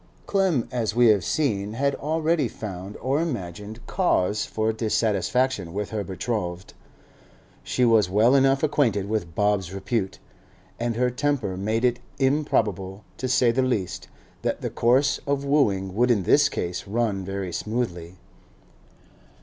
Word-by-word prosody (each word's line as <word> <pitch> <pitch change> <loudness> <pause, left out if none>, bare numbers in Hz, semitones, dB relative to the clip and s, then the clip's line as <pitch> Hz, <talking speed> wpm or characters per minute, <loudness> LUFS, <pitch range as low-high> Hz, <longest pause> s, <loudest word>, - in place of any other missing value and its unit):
Clem, 190 - +1
as 115 -4 -1
we 120 -1 +6
have 105 -3 +4
seen, 105 -9 -1
had 140 +4 0
already 160 0 0
found, 100 -3 -7
or 135 +5 0
imagined, 105 - -5
cause 105 - +1
for 110 0 -1
dissatisfaction 110 -1 0
with 105 0 -3
her 105 -2 -2
betrothed. 95 -2 -4 0.9
She 125 - 0
was 110 -5 +4
well 110 +6 +4
enough 135 0 +3
acquainted 120 -10 +1
with 100 -7 -3
Bob's 105 -4 +1
repute, 95 +1 -2 0.6
and 120 -1 -1
her 125 +1 +1
temper 130 -7 -1
made 110 +5 0
it 125 -1 +1 0.2
improbable, 110 - 0
to 130 - -3
say 125 -2 +3
the 130 +3 +1
least, 120 -8 -2 0.3
that - - -2
the - - -3
course 125 +4 +2
of 140 0 0
wooing 100 -10 +1
would 120 +5 +2
in 110 -6 +3
this 145 +9 +4
case 90 +2 -4
run 105 -2 -1
very 95 -2 -4
smoothly. 95 -6 -3
110 Hz, 140 wpm, -24 LUFS, 100-130 Hz, 0.9 s, we